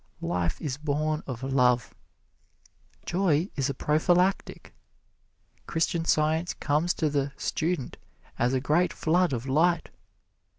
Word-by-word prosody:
Life 85 Hz, 0 st, -1 dB
is 140 Hz, -5 st, -3 dB
born 150 Hz, +1 st, -1 dB
of 130 Hz, -2 st, -6 dB
love. 125 Hz, -3 st, +2 dB, 1.1 s
Joy 175 Hz, -1 st, +1 dB
is 135 Hz, 0 st, 0 dB
a 140 Hz, -, -3 dB
prophylactic. 175 Hz, +5 st, +1 dB, 0.9 s
Christian 165 Hz, 0 st, 0 dB
Science 160 Hz, +2 st, +1 dB
comes 155 Hz, +4 st, 0 dB
to 160 Hz, -, 0 dB
the 140 Hz, -1 st, -1 dB
"student" 165 Hz, -4 st, -2 dB, 0.4 s
as 125 Hz, +2 st, +2 dB
a -, -, +2 dB
great 155 Hz, +7 st, +1 dB
flood 175 Hz, +2 st, +1 dB
of 120 Hz, -1 st, -3 dB
light. 165 Hz, +5 st, +1 dB
150 Hz, 120 wpm, -27 LUFS, 135-170 Hz, 1.1 s, love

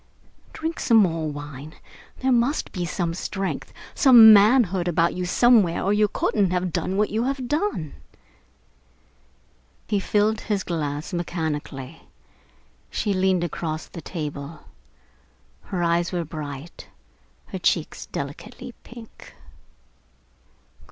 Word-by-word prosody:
Drink 325 Hz, +1 st, -4 dB
some 230 Hz, -, +4 dB
more 165 Hz, -6 st, +2 dB
wine. 145 Hz, +1 st, -8 dB, 0.5 s
There 260 Hz, 0 st, +2 dB
must 245 Hz, +5 st, +1 dB
be 180 Hz, -2 st, -3 dB
some 170 Hz, -1 st, -2 dB
strength, 195 Hz, +2 st, -4 dB, 0.2 s
some 235 Hz, -5 st, +9 dB
manhood 200 Hz, -4 st, +4 dB
about 170 Hz, 0 st, +2 dB
you 180 Hz, 0 st, -3 dB
somewhere, 215 Hz, -4 st, +4 dB
or 200 Hz, -, +2 dB
you 210 Hz, 0 st, +3 dB
couldn't 200 Hz, -1 st, 0 dB
have 180 Hz, -1 st, -1 dB
done 190 Hz, -, -1 dB
what 210 Hz, +1 st, +1 dB
you 225 Hz, +3 st, 0 dB
have 265 Hz, -2 st, -2 dB
done." 295 Hz, -, -2 dB, 1.9 s
He 205 Hz, -, +1 dB
filled 210 Hz, +2 st, +1 dB
his 205 Hz, -3 st, -2 dB
glass 150 Hz, -1 st, -4 dB
mechanically. 155 Hz, -6 st, -4 dB, 0.9 s
She 205 Hz, -, -1 dB
leaned 185 Hz, -2 st, +1 dB
across 160 Hz, -1 st, -4 dB
the 170 Hz, -, -10 dB
table. 150 Hz, -2 st, -6 dB, 1.0 s
Her 180 Hz, -3 st, -3 dB
eyes 170 Hz, 0 st, +1 dB
were 175 Hz, -2 st, -2 dB
bright, 150 Hz, 0 st, -8 dB, 0.6 s
her -, -, -5 dB
cheeks -, -, -1 dB
delicately -, -, -7 dB
pink. 235 Hz, -2 st, -13 dB
180 Hz, 120 wpm, -24 LUFS, 160-215 Hz, 1.9 s, some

